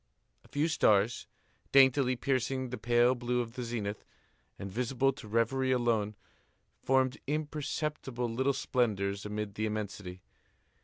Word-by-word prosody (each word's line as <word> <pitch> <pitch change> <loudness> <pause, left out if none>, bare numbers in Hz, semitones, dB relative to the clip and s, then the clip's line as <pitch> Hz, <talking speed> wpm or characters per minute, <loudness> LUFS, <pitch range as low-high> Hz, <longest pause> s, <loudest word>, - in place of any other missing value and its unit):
A - - -19
few 145 +3 0
stars, 110 -8 +2 0.4
daintily 130 -1 +5
piercing 130 0 -1
the 125 - -3
pale 120 +1 +4
blue 125 0 -1
of 115 -1 -3
the 125 - -5
zenith, 110 -4 -4 0.5
and 100 - -6
visible 125 +4 +1
to 130 -5 -11
reverie 115 +4 +1
alone, 115 -4 +1 0.7
formed 130 +1 +2
imperceptible 150 -4 -2
little 130 +4 +1
splendors 100 -6 -1
amid 105 -1 -4
the 110 +1 -1
immensity. 100 -3 -5
120 Hz, 125 wpm, -31 LUFS, 105-130 Hz, 0.7 s, daintily